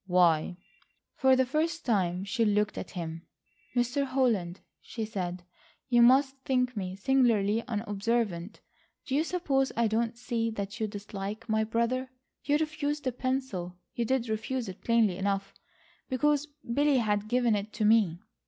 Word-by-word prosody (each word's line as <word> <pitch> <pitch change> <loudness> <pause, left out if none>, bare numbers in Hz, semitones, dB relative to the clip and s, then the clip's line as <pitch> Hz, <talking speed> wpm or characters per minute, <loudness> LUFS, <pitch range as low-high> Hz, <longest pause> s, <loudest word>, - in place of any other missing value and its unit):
"Why?" 175 -1 +3 0.6
For 265 -1 +4
the 260 0 +3
first 320 +5 -1
time 185 -5 +1
she 230 +4 0
looked 210 0 +2
at - - -6
him. 165 -2 -6 0.5
"Mr. 245 +3 +1
Holland," 235 -10 0 0.2
she 225 -2 -5
said, 180 -4 -4 0.5
"you 240 -1 +5
must 265 +3 +5
think 250 -2 0
me 185 -2 -4
singularly 230 -2 +2
unobservant. 210 -3 -2 0.4
Do 265 - -4
you 295 +3 +3
suppose 290 -7 0
I 235 - +3
don't 225 +2 0
see 235 -1 -1
that 205 +1 -5
you 220 - 0
dislike 205 +1 -6
my 220 -1 +2
brother. 235 +4 -1 0.3
You 290 0 +2
refused 300 -1 -2
the 255 - 0
pencil—you 240 -7 -3
did 255 0 0
refuse 225 +3 -2
it 185 - -9
plainly 225 -6 +3
enough—because 255 +8 -2 0.3
Billy 285 +1 +3
had 210 -3 0
given 245 0 +2
it 205 +1 -3
to 215 - 0
me. 210 -6 +3
230 Hz, 145 wpm, -29 LUFS, 200-260 Hz, 0.6 s, you